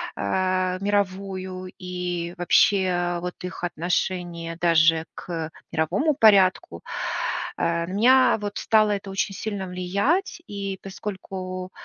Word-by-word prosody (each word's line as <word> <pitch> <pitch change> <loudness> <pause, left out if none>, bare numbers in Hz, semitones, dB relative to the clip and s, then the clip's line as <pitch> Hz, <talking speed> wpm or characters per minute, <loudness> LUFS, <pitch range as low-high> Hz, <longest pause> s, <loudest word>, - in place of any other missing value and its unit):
э, 185 - 0
мировую 190 -2 -2
и 180 -2 -4
вообще 175 -1 +3
вот 180 0 -4
их 180 -1 -4
отношение 175 0 -2
даже 165 -1 +4
к 165 -3 -5 0.2
мировому 190 - +1
порядку, 195 - +4 0.8
э, 170 0 0
на 185 - -6
меня 255 +5 +5
вот 205 0 -4
стало 215 -1 +3
это 200 -1 -3
очень 195 +1 -2
сильно 200 -1 -4
влиять. 200 - 0
И 195 -1 -4
поскольку 185 -2 -6
185 Hz, 110 wpm, -24 LUFS, 175-200 Hz, 0.8 s, меня